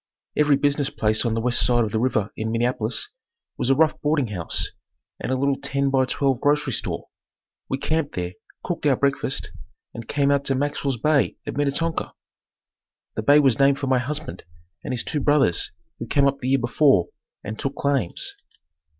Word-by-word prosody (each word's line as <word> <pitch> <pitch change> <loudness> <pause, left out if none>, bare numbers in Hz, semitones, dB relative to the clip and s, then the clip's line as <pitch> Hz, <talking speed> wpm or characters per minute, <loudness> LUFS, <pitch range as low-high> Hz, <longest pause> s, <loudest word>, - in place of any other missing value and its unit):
Every 150 -1 +4
business 145 0 +1
place 110 -3 0
on 115 -1 0
the 115 - -1
west 120 +1 +2
side 120 -1 +3
of 110 - -3
the 110 - 0
river 110 -4 0
in 110 0 -3
Minneapolis 115 -1 -1 0.5
was 125 - -1
a 135 - +5
rough 155 +2 +2
boarding 145 -5 +1
house 90 -5 -1 0.5
and - - -3
a - - +2
little 140 +1 +1
ten 140 0 0
by 130 -1 +3
twelve 135 -1 0
grocery 145 -2 +2
store. - - -2 0.6
We 135 - -1
camped 155 +1 -1
there, 90 0 -3 0.3
cooked 165 -4 -2
our 135 - +4
breakfast, 140 0 -1 0.4
and 115 -1 -8
came 140 -1 +1
on - - +5
out 140 - -9
to 135 - +1
Maxwell's 140 -1 -1
bay 150 +3 +2
at - - -5
Minnetonka. 145 +3 -1 1.0
The - - -3
bay 145 +7 +5
was 135 -5 +3
named 140 0 +4
for 140 - -3
my 130 -1 +2
husband 150 +5 -4 0.4
and 145 - -4
his 125 - -2
two 150 - -2
brothers 145 - +2 0.3
who 115 - -5
came 140 +4 +3
up 140 0 +1
the 130 - -3
year 135 - +4
before 120 - +3 0.3
and 110 +2 -6
took 135 0 -3
claims. 140 -10 -1
135 Hz, 190 wpm, -23 LUFS, 120-145 Hz, 1.0 s, a